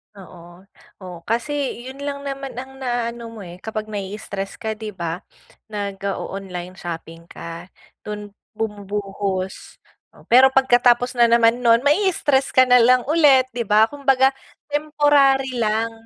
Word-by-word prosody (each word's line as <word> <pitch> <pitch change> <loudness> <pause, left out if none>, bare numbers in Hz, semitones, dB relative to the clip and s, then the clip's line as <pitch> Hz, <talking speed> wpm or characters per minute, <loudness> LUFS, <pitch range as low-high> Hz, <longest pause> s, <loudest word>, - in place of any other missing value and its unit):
Oo, 180 -2 -14 0.4
oh, 180 -2 -8
kasi 250 +2 -2
yun 265 +2 -9
lang 280 0 -5
naman 275 -2 -6
ang 265 +2 -8
naaano 240 -2 -3
mo, 225 -2 -10
eh, 175 0 -11
kapag 215 +1 -5
na-i-stress 200 -1 -5
ka 220 - -4
'di 215 -2 -8
ba, 170 -1 -4 0.5
nag-o-online 195 -3 -5
shopping 165 -1 -8
ka, 170 +1 -9 0.4
dun 210 -1 -6 0.2
bumubuhos, 200 -3 -4 0.5
pero 260 +2 +8
pagkatapos 245 -2 +3
na 240 -1 +4
naman 235 0 +4
nun 235 0 +4
ma-i-stress 295 -5 +2
ka 260 - +5
na 250 0 +6
lang 250 +1 +4
ulit 290 -4 +5
'di 240 - -3
ba 215 +1 +5
kumbaga 270 -2 +3 0.4
temporary 285 -3 +2
lang, 220 +1 0
230 Hz, 130 wpm, -21 LUFS, 200-265 Hz, 0.5 s, pero